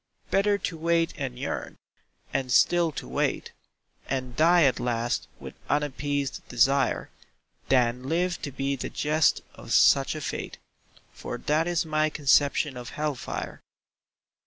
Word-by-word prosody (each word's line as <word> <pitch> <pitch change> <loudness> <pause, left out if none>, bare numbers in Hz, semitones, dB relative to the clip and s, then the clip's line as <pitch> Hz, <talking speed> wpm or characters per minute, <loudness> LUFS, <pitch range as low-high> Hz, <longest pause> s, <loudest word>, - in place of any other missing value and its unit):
Better 205 +1 +3
to 170 -4 -5
wait 165 0 +1
and 130 -4 -5
yearn, 135 - -5 0.6
and 130 -2 -1
still 170 +5 +4
to - - -6
wait, 65 - -1 0.6
And 130 -2 -3
die 170 +3 +5
at 135 -3 +3
last 120 -1 -1
with - - -9 0.2
unappeased 145 -1 -1
desire, 135 +3 +2 0.6
Than 125 0 +2
live 175 +2 0
to 145 - -5
be 135 +1 -2
the 130 - -5
jest 155 0 +1
of - - -11
such 135 +2 +5
a 155 - -5
fate, - - -5 0.6
For - - -6
that 155 +3 0
is 175 -1 0
my 155 0 +1
conception 145 -1 +2
of 120 -1 -7
hell 150 0 0
fire. 125 - -6
145 Hz, 140 wpm, -26 LUFS, 130-160 Hz, 0.6 s, die